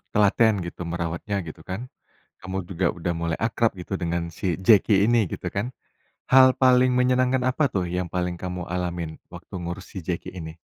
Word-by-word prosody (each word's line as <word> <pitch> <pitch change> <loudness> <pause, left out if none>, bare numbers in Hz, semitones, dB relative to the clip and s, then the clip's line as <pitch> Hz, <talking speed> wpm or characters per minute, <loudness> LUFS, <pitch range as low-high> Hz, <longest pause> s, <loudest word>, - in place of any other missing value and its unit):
telaten 105 +1 +4
gitu 85 +1 -7
merawatnya 85 +4 -3
gitu 80 - -9
kan, 95 +7 -5 0.5
kamu 95 +1 -5
juga 90 -1 0
udah 85 0 -2
mulai 85 -1 -2
akrab 115 0 +1
gitu 95 +2 -4
dengan 85 -1 -2
si 85 +1 -2
Jeki 100 0 +5
ini 120 -2 +4
gitu - - -4
kan. 115 +6 -3 0.6
Hal 130 0 +7
paling 130 0 +5
menyenangkan 125 +1 +2
apa 140 +1 +1
tuh 90 -3 -1
yang 90 +1 -1
paling 90 -1 -1
kamu 90 0 -5
alamin, 85 -3 -3 0.2
waktu - - -11
ngurus 90 +3 -6
si 90 - -5
Jeki 85 -2 -3
ini? 80 -1 -7
95 Hz, 175 wpm, -25 LUFS, 85-115 Hz, 0.6 s, Hal